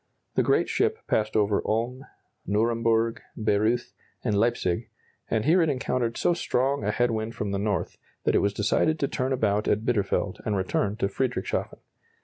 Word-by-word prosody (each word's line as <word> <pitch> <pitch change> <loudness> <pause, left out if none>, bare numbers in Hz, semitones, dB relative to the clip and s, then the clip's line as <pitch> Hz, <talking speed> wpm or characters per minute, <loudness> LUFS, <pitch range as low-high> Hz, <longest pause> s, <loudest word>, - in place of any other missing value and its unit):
The - - +3
great - - +2
ship - - +1
passed 110 0 0
over 105 -1 +2
Ulm, 120 +4 -2 0.4
Nuremburg, 115 +2 +1 0.2
Bayreuth, 110 +2 +1 0.3
and 105 - +1
Leipzig; 100 -5 0 0.4
and 110 0 0
here 170 +5 +5
it 160 - +2
encountered 125 -3 -1
so 175 - +2
strong 140 -5 0
a 105 - 0
head 120 +3 +1
wind 110 +1 -3
from 105 -2 -3
the 100 - -1
north, 100 -4 -2 0.2
that - - +2
it - - +4
was 100 - +2
decided 115 +10 +1
to 140 - 0
turn 130 0 -2
about 105 -5 +1
at 110 +2 +1
Bitterfeld 100 -4 0
and 105 -2 0
return 100 +2 0
to 110 - 0
Friedrichshafen. 125 +4 -2
110 Hz, 170 wpm, -26 LUFS, 105-125 Hz, 0.4 s, here